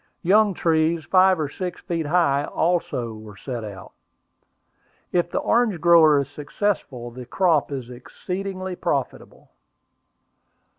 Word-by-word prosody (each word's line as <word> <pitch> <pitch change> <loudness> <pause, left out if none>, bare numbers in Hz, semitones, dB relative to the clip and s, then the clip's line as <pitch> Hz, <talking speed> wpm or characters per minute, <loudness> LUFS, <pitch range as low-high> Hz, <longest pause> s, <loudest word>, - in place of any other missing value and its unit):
Young 205 +2 +4
trees, 160 -1 +1
five 185 +1 +4
or 155 - -1
six 180 +5 -6
feet 165 -4 -3
high, 145 -4 +2
are - - -5
also 115 - -2
set 120 +1 -6
out. 100 -3 -9 1.2
If 175 -1 +1
the - - -3
orange 225 -7 +1
grower 165 -3 +6
is 140 - -2
successful, 145 - -3
the 125 0 -10
crop 165 -3 +1
is 130 -3 -6
exceedingly 185 +8 -6
profitable. 140 -7 -4
160 Hz, 120 wpm, -23 LUFS, 130-185 Hz, 1.2 s, grower